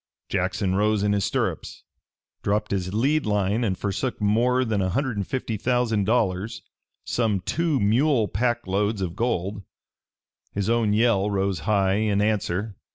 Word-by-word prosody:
Jackson 95 0 0
rose 105 +1 +2
in 105 0 +2
his 100 -1 +1
stirrups, - - -3 0.6
dropped 105 +1 -1
his 95 -2 -1
lead 135 +6 +1
line 105 +2 +1
and 95 -5 0
forsook 105 +6 -2
more 120 +5 +2
than 110 -4 0
a 95 - 0
hundred 130 +3 -1
and 100 -2 -3
fifty 120 -4 -3
thousand 115 -3 +1
dollars 110 -1 0 0.4
some 110 -5 0
two 155 - 0
mule 115 +3 +3
pack 120 +4 -1
loads 100 +1 0
of 85 -2 -4
gold. 100 -3 -1 0.9
His 100 +2 -1
own 115 -3 +2
yell 105 -2 +3
rose 95 -3 0
high 100 -2 +3
in 105 -2 +1
answer. 105 -1 -1
105 Hz, 155 wpm, -24 LUFS, 100-120 Hz, 0.9 s, mule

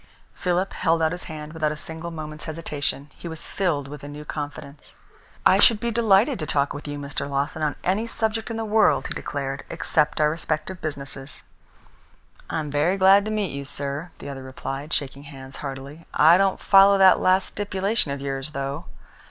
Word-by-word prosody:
Philip 180 +1 -1
held 165 0 +2
out 160 - +3
his 180 0 -5
hand 155 -1 -7
without 155 -2 0
a 150 - -5
single 160 +2 -6
moment's 155 -2 -7
hesitation. 150 -2 -3
He - - -7
was 160 -1 -6
filled 160 -8 -1
with 145 0 -9
a - - -6
new 150 +1 -8
confidence. 145 -1 -7 0.5
"I - - +6
should 225 -3 +6
be 235 +1 -1
delighted 225 +3 +3
to 155 - -3
talk 140 +2 +1
with 145 - -8
Mr. 145 -1 -4
Lawton 140 +3 -1
on 150 -1 0
any 200 +5 +1
subject 225 0 -1
in 225 - -3
the 225 - -2
world," 215 +1 +3
he - - 0
declared, 135 -1 -4
"except 150 -1 +1
our 150 0 +4
respective 165 +3 -3
businesses." 140 -2 -4 1.1
"I - - -2
am 150 -2 -5
very 155 +7 +2
glad 195 +1 +6
to - - -2
meet 210 -3 -1
you, 140 - -4
sir," 140 +3 -4
the - - -9
other 135 -1 -6
replied, 135 +3 -6
shaking 140 -2 -2
hands 135 -2 -10
heartily. 140 +3 -7
"I 160 +3 +7
don't 195 0 +2
follow 195 0 +6
that 190 -1 +7
last 185 +1 +3
stipulation 200 -2 -1
of 140 0 -3
yours, 135 +1 -4
though." 140 +4 -3
155 Hz, 190 wpm, -24 LUFS, 140-190 Hz, 1.1 s, I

